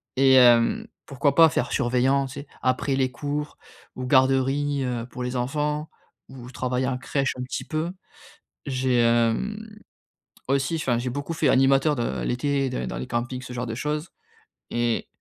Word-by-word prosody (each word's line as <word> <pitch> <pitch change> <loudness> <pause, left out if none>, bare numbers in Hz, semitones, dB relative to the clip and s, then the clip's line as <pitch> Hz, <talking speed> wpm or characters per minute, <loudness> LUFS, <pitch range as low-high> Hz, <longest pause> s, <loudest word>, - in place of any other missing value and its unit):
Et, 130 0 +5
heu, 125 - +4 0.2
pourquoi 140 0 0
pas 165 -1 +8
faire 130 -3 -2
surveillant, 130 +3 +2
tu 130 - -10
sais, 140 - -8
après 130 +2 0
les 130 -1 +1
cours 145 +3 -4 0.4
ou 130 - -4
garderie, 135 +2 +2
heu, 120 -2 -3
pour 125 0 -9
les 125 +1 -3
enfants 150 +4 -2 0.4
ou 125 -2 -10
travailler 130 0 -2
en 130 - -1
crèche 135 +1 -1
un 125 - -4
petit 125 - -5
peu. 160 +2 -2 0.8
J'ai, 130 -2 0
hem, 120 - +2 0.9
aussi 135 +4 +1
enfin, 130 -7 0
j'ai 125 +1 -3
beaucoup 145 +5 -4
fait 155 -2 +1
animateur, 135 +3 +4
de, 120 - -1
heu, 65 - -2
l'été, 135 - 0
dans 125 - -3
dans - - -5
les - - -5
campings, 125 +1 -3
ce 125 -1 -8
genre 125 0 -4
de 115 - -4
choses 150 +5 -3 0.6
et 120 -1 0
130 Hz, 175 wpm, -24 LUFS, 125-145 Hz, 0.9 s, pas